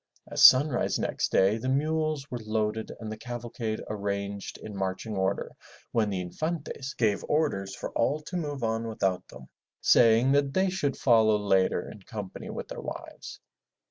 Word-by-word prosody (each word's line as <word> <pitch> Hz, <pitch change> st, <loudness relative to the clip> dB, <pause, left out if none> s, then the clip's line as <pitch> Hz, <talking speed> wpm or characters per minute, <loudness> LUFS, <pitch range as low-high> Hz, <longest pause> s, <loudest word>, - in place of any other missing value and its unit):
At -, -, -3 dB
sunrise 130 Hz, 0 st, +6 dB
next -, -, -1 dB
day 100 Hz, +4 st, +3 dB
the 130 Hz, +3 st, -2 dB
mules 155 Hz, 0 st, 0 dB
were 125 Hz, -, -3 dB
loaded 110 Hz, 0 st, -2 dB
and 110 Hz, -1 st, -6 dB
the 110 Hz, -, -5 dB
cavalcade 120 Hz, -2 st, -4 dB
arranged 100 Hz, -1 st, -4 dB
in 105 Hz, -, -9 dB
marching 95 Hz, +3 st, -3 dB
order 95 Hz, +1 st, -1 dB, 0.4 s
when 110 Hz, -3 st, +1 dB
the 95 Hz, -2 st, -2 dB
Infantes 145 Hz, -, -4 dB
gave 110 Hz, -4 st, +1 dB
orders 100 Hz, -11 st, 0 dB
for -, -, -6 dB
all 140 Hz, +6 st, +1 dB
to 180 Hz, -, -7 dB
move 145 Hz, -6 st, -3 dB
on 115 Hz, 0 st, -1 dB
without 95 Hz, -5 st, -1 dB
them, -, -, -12 dB, 0.3 s
saying 115 Hz, +3 st, +5 dB
that 140 Hz, -1 st, +2 dB
they 190 Hz, 0 st, +2 dB
should 145 Hz, -7 st, -1 dB
follow 110 Hz, -4 st, +4 dB
later 95 Hz, -3 st, +1 dB
in 105 Hz, -, -11 dB
company 100 Hz, -1 st, -7 dB
with -, -, -6 dB
their -, -, -6 dB
wives. -, -, -8 dB
115 Hz, 165 wpm, -28 LUFS, 100-140 Hz, 0.4 s, sunrise